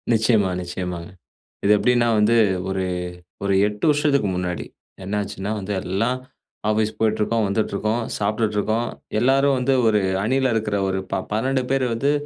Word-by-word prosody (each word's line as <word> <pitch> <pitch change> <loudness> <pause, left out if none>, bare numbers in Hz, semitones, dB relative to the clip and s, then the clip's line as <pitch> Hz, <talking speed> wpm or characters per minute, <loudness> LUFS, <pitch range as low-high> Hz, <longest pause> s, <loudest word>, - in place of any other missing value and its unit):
நிச்சியமா, 110 -3 +3
நிச்சியமாங்க. 90 -1 -5 0.5
இது 100 - +4
எப்டின்னா 120 +2 +3
வந்து, 105 +2 +4 0.3
ஒரு 95 -1 -1 0.6
ஒரு 100 0 +1
8 105 0 -3
வருஷத்துக்கு 145 -6 +2
முன்னாடி 90 -1 -3 0.4
என்னாச்சுன்னா 100 0 -3
வந்து, 100 +1 -5
எல்லாம் 115 +8 0 0.5
ஆஃபீஸ் 110 0 +1
போயிட்டுருக்கோம், 110 0 +1
வந்துட்ருக்கோம், 110 +2 -1 0.2
சாப்ட்டுட்ருக்கோம். 110 +2 0 0.3
எல்லாரும் 135 +3 +3
வந்து, 130 +2 +1
ஒரு 105 -1 +4 0.2
அணியில 130 +3 +1
இருக்குற 105 -2 0
ஒரு 95 0 -1
ப - - 0
12 130 +4 0
பேர் 135 -1 +2
வந்து, 135 +5 +1
110 Hz, 130 wpm, -22 LUFS, 100-120 Hz, 0.6 s, இது